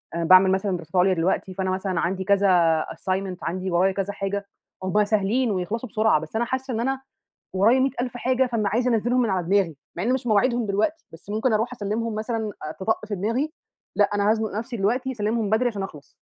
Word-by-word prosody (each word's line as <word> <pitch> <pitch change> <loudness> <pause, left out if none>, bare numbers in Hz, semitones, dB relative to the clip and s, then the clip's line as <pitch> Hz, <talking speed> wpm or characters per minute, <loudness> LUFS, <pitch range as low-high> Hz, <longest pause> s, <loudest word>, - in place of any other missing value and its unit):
أنا 170 - -1
باعمل 185 +2 +7
مثلًا 190 0 0
دراسات 170 +2 -11
عُليا 185 +1 +4
دلوقتي، 185 +2 -1
فأنا 190 0 -2
مثلًا 185 -2 -1
عندي 185 +2 -1
كذا 180 -5 +3
assignment 190 -1 -3
عندي 185 +1 -3
ورايا 185 +3 +3
كذا 200 +1 -2
حاجة، 200 0 -3 0.4
هم 210 +3 +2
سهلين 215 +3 +1
ويخلصوا 210 +6 -3
بسرعة، 215 -6 +3
بس 160 +7 -9
أنا 235 +2 +1
حاسّة 260 +1 -3
إن 220 - -2
أنا 265 +2 -1 0.6
ورايا 230 +7 +4
مِيَّة 270 +1 +2
ألف 245 -1 -3
حاجة، 255 +1 +1
فما 225 -4 0
عايزة 245 +4 +1
أنَزّلهم 240 +3 +2
من 230 - 0
على 180 -3 -1
دماغي، 190 -6 +2 0.2
مع 175 - -3
إن 245 +4 +1
مش 260 -1 -3
مواعيدهم 235 +1 +2
دلوقتي، 220 +12 -1
بس 165 +5 -12
ممكن 220 +3 +1
أروح 225 +3 0
أسلِّمهم 220 0 -2
مثلًا 220 -1 -3
آآ 155 - -4
تِطَق 215 +1 -1
في 210 - -3
دماغي، 230 - -1 0.4
لأ 205 - +5
أنا 205 +1 +2
هازنُق 220 -1 0
نفسي 235 +1 -5
دلوقتي 250 +6 0
أسلِّمهم 215 -1 -1
بدري 240 +3 +3
عشان 205 -4 -4
أخلص، 150 -7 -10
210 Hz, 210 wpm, -24 LUFS, 190-235 Hz, 0.6 s, باعمل